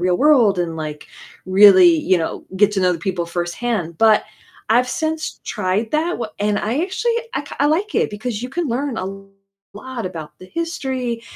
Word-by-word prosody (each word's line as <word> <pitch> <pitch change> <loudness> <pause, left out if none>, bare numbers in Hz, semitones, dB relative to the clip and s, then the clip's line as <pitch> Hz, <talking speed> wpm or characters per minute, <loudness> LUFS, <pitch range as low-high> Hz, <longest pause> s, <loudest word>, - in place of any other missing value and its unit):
real 180 0 +2
world 250 -10 +4
and, 165 -2 -3
like, 150 -1 -6 0.4
really, 190 -1 +8
you 185 +4 +2
know, 160 - -4
get 205 +1 +4
to 195 - 0
know 180 -1 +3
the 170 - -4
people 175 -1 -2
firsthand." 175 +1 -3
But 220 -1 +5 0.5
I've 250 +2 +4
since 315 +1 -3
tried 210 +2 -1
that 320 +3 +1
w 230 - -3
and 205 0 0
I 240 +9 -1
actually, 400 +6 -1 0.2
I 275 - -1
k 285 - -10
I 290 - +4
like 365 +8 0
it - - +1
because 220 +1 -4
you 250 - -4
can 330 +2 -3
learn 255 +1 -2
a 185 - -3 0.7
lot 240 -1 -6
about 160 -4 -8
the 185 - -12
history, 260 - -3
220 Hz, 190 wpm, -20 LUFS, 185-275 Hz, 0.7 s, really